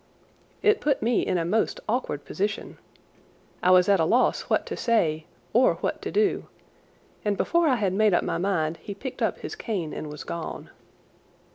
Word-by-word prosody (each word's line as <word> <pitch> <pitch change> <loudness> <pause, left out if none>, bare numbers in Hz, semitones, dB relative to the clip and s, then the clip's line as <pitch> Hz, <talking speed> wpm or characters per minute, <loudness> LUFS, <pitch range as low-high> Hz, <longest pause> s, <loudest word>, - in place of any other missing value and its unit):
It 425 -1 +4
put 290 -2 +1
me 235 +1 +2
in 185 - 0
a 165 - 0
most 220 +6 0
awkward 210 - -2
position. 205 +6 -3 0.8
I 180 - +3
was 180 -1 +6
at 200 -2 +4
a - - +3
loss 240 +10 +2
what - - +2
to - - -5
say 160 -10 +1 0.3
or 245 +3 +4
what - - -3
to - - -4
do, 420 -1 +1 0.8
and 205 -2 0
before 340 -1 +2
I 265 - +4
had 200 -5 0
made 210 -1 +3
up - - +2
my 165 - -2
mind 170 -4 0
he 200 - -8
picked 255 +5 -7
up - - +1
his - - -5
cane 195 - -3
and 150 - -6
was 150 - -7
gone. 170 -1 -6
200 Hz, 185 wpm, -26 LUFS, 170-240 Hz, 0.8 s, was